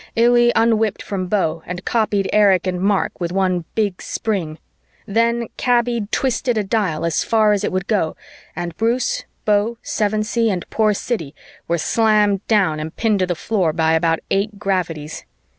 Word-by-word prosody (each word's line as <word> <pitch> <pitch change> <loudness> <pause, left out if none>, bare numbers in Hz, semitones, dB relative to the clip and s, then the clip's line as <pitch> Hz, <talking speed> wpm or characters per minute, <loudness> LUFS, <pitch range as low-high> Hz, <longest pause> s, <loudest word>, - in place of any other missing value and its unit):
Illy 240 +1 +4
un 225 -1 +3
whipped 220 -2 -1
from 185 -2 -3
Beau 175 -5 0
and 180 +1 -6
copied 210 -4 +1
Erich 200 -3 +4
and 180 -1 -2
Mark 200 0 0
with 170 0 -2
one 185 -2 0
big 205 -4 -1
spring. 180 -8 -3 0.5
Then 230 +2 +1
Kaby 240 -3 +1
twisted 245 -2 0
a 215 - +1
dial 195 -7 -1
as 165 -2 0
far 215 -2 +3
as 205 0 -1
it - - -1
would 185 0 -2
go 190 -8 0 0.4
and 175 -2 -5
Bruce, 250 - 0 0.2
Beau, 210 +2 +1
Sevensee 215 +2 0
and 185 -4 -3
poor 215 -2 +2
Siddy 165 - -4 0.3
were 170 - +1
slammed 210 +1 +2
down 190 -8 +2
and 155 +1 -6
pinned 220 -3 +1
to 185 - +1
the 175 - -1
floor 180 -3 0
by 160 0 +2
about 165 0 +2
eight 200 +1 0
gravities. 175 -6 -3
205 Hz, 170 wpm, -20 LUFS, 180-225 Hz, 0.5 s, Illy